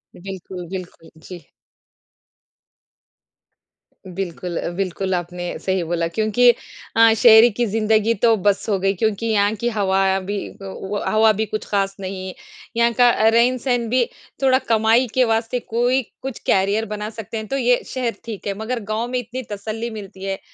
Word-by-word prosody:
बिल्कुल, 185 -1 -8
बिल्कुल, 180 -3 -9 0.2
जी। 180 -2 -10 2.7
बिल्कुल 175 -1 -4
अ, - - -2
बिल्कुल 190 +1 -2
आपने 175 0 -4
सही 190 -2 -1
बोला 165 0 -1
क्योंकि 215 +7 +3 0.5
अ, 225 0 +6
शहर 225 +1 +7
की 240 - +2
ज़िंदगी 220 +1 +2
तो 230 +1 +3
बस 200 +1 +1
हो 200 - +2
गई, 195 +1 +1
क्योंकि 215 +2 -1
यहाँ 205 -1 +2
की 235 +3 -1
हवा 195 -3 +1
भी 200 +2 -4 0.2
तो 195 -1 -7
वो 205 +1 -2
हवा 220 0 +4
भी 220 - +1
कुछ 215 0 -5
खास 195 -1 0
नहीं, 185 -1 -5 0.4
यहाँ 235 0 +3
का 245 +1 +5 0.2
रहन-सहन 240 +1 +2
भी 250 +1 +3 0.4
थोड़ा 260 -1 +4
कमाई 225 +3 +3
के 255 - +4
वास्ते 225 +2 0
कोई 245 +3 +1 0.2
कुछ 265 -2 -6
करियर 200 +3 +2
बना 210 0 -5
सकते 225 0 -7
हैं, 220 -1 -5
तो 275 - -2
ये 245 -1 +2
शहर 250 -3 -2
ठीक 215 -3 -7
है, 200 - 0
मगर 230 +3 -3
गाँव 215 +3 -2
में 250 0 -1
इतनी 245 +2 -6
तसल्ली 215 +3 -4
मिलती 200 -3 -9
है 195 0 -3
215 Hz, 165 wpm, -21 LUFS, 195-235 Hz, 2.7 s, शहर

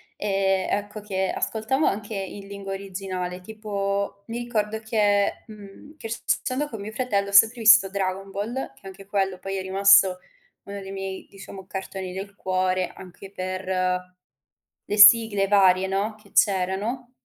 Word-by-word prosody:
e, 195 -2 0
ecco, 205 +1 -3
che 190 -2 -2
ascoltavo 230 +7 -1
anche 210 +2 -3
in 195 +1 -6
lingua 200 -1 -6
originale. 185 -2 -5
Tipo, 200 -1 -3
mi 230 0 -5
ricordo 220 -3 -2
che, 210 -2 +1
mhmm, 215 +8 -13
crescendo 250 +4 -2
con 225 - -7
mio 205 +2 -6
fratello 205 -5 -1
ho - - -7
sempre 225 +4 +6
visto 225 -3 +7
Dragon 195 0 -3
Ball, 220 - -4
che - - -23
anche 195 +1 -11
quello 195 -2 -1
poi 195 +1 -4
è 190 - -2
rimasto 190 -1 +5 0.4
uno 200 0 -7
dei 195 0 -8
miei, 195 -1 -6
diciamo, 195 -1 -11
cartoni 190 -1 -6
del 195 +1 -7
cuore 185 -1 0
anche 190 +1 -12
per 185 -1 -5 1.2
le 210 - -2
sigle 210 -1 +7
varie, 190 -2 +4
no, 200 +3 -1
che 200 -2 -21
c'erano 205 +6 +1
200 Hz, 150 wpm, -24 LUFS, 190-215 Hz, 1.2 s, visto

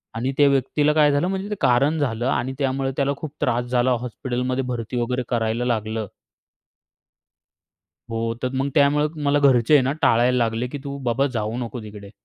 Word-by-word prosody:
आणि 125 +4 -1
त्या 145 - +6
व्यक्तीला 140 +2 +1
काय 150 -1 +4
झालं, 145 +5 +1
म्हणजे 190 +2 -3
ते 210 - -2
कारण 140 +6 +3
झालं. 120 -4 -1
आणि 130 0 -1
त्यामुळे 135 -1 -1
त्याला 140 0 +1
खूप 155 -1 -6
त्रास 120 -1 0
झाला. 125 +1 +1
हॉस्पिटलमध्ये 125 +1 -3
भरती 120 0 -3
वगैरे 125 +1 -1
करायला 115 0 0
लागलं. 110 -2 -2 2.0
हो, 115 0 -1
तर 130 - +1
मग 135 +1 0
त्यामुळे 145 0 +4 0.2
मला 145 0 +3
घरचे 135 -2 +4
आहे 145 - +7
ना 130 - 0
टाळायला 120 +2 +3
लागले, 115 0 0
की 145 - -6
"तू 140 -1 -5
बाबा 135 +4 +1
जाऊ 110 0 -2
नको 120 -1 -5
तिकडे." 105 -1 -10
125 Hz, 175 wpm, -22 LUFS, 115-140 Hz, 2.0 s, आहे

